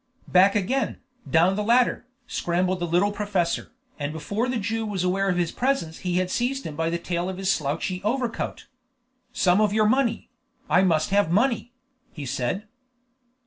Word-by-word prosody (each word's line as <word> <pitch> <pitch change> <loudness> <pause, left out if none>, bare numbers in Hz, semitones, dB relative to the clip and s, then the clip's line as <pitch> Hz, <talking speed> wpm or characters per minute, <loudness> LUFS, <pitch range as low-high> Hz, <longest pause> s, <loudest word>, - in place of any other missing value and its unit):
Back 190 +3 +5
again, 245 +7 0 0.3
down 170 +3 +4
the 210 - -1
ladder, 245 +2 +2 0.2
scrambled 180 -3 -1
the 175 - -2
little 180 +5 +2
professor, 205 -4 -1 0.3
and 145 0 -2
before 200 +10 -2
the 250 - 0
Jew 225 +1 -2
was 205 -4 -2
aware 195 +2 +1
of 180 - +1
his 175 -2 0
presence 250 -12 -1
he 180 -1 -1
had 185 0 0
seized 260 +5 -1
him 155 - -5
by 165 +1 0
the 170 - -1
tail 175 +1 -2
of 190 - -5
his 195 0 +1
slouchy 165 +5 -2
overcoat. 235 +2 -2 0.7
"Some 185 +2 +3
of 210 -1 +2
your 215 0 +3
money! 255 +1 +1 0.4
I 180 - +4
must 165 -3 +2
have 200 -4 +3
money!" 235 +6 +1 0.4
he 150 -4 -7
said. 130 +8 -2
190 Hz, 175 wpm, -25 LUFS, 175-220 Hz, 0.7 s, Back